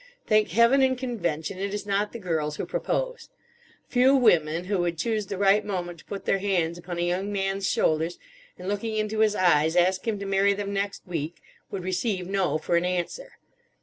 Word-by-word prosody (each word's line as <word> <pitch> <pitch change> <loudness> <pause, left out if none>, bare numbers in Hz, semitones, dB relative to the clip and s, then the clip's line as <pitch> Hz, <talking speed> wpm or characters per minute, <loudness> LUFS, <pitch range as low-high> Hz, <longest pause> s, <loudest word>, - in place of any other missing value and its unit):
Thank 215 0 +3
Heaven 235 +8 +4
and 260 -1 +3
Convention 185 - -3
it 200 +1 -2
is 205 -1 -5
not 205 +1 0
the - - -6
girls 160 -7 -2
who - - -4
propose! - - -3 0.6
Few 255 +2 +4
women, 170 - +3
who 195 +1 -1
would 175 -1 -1
choose 215 +3 -1
the 195 - -4
right 200 +2 +4
moment 175 -4 -4
to - - -17
put 200 - -7
their 195 - +2
hands 175 -4 0
upon 175 0 -6
a - - -1
young 185 +4 -1
man's 195 -1 -1
shoulders, 160 +2 +1 0.4
and, 180 - -8
looking 215 +2 -2
into 215 0 -1
his 215 -1 +3
eyes, 160 -3 +3
ask 185 +4 +2
him 220 -2 0
to 200 - -6
marry 195 +1 +2
them 200 0 -4
next 200 0 -3
week, 165 -2 -4 0.3
would 190 -2 -5
receive 185 +1 -1
No 190 -3 0
for 170 +2 0
an 170 - +1
answer. 180 - -3
195 Hz, 200 wpm, -26 LUFS, 175-215 Hz, 0.6 s, Heaven